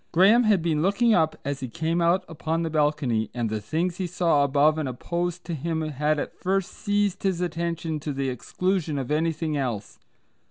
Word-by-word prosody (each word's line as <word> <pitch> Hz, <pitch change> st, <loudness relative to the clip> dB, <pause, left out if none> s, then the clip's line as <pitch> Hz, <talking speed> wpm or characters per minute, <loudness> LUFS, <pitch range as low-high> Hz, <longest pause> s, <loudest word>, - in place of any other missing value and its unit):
Graham 205 Hz, +8 st, +5 dB
had 205 Hz, -6 st, +3 dB
been 160 Hz, -3 st, +1 dB
looking 200 Hz, +6 st, +3 dB
up 160 Hz, -5 st, +2 dB
as 140 Hz, 0 st, -2 dB
he 130 Hz, -, -4 dB
came 165 Hz, +6 st, -1 dB
out 175 Hz, +2 st, +2 dB
upon 165 Hz, +1 st, -2 dB
the 165 Hz, -, -2 dB
balcony, 145 Hz, -8 st, +1 dB
and 115 Hz, -3 st, -1 dB
the 110 Hz, -1 st, -2 dB
things 170 Hz, -, -1 dB
he 185 Hz, -, -2 dB
saw 170 Hz, -4 st, +2 dB
above 145 Hz, +3 st, +3 dB
and 145 Hz, -4 st, -2 dB
opposed 175 Hz, +7 st, -3 dB
to 170 Hz, -, -4 dB
him 160 Hz, +2 st, -2 dB
had 150 Hz, +1 st, 0 dB
at -, -, -3 dB
first 190 Hz, 0 st, 0 dB
seized 205 Hz, -1 st, 0 dB
his 190 Hz, -3 st, 0 dB
attention 170 Hz, -2 st, -2 dB
to 150 Hz, +1 st, -4 dB
the 135 Hz, -1 st, -2 dB
exclusion 165 Hz, -, -1 dB
of 135 Hz, 0 st, -3 dB
anything 160 Hz, 0 st, 0 dB
else. 120 Hz, -7 st, -3 dB
160 Hz, 195 wpm, -25 LUFS, 145-175 Hz, -, Graham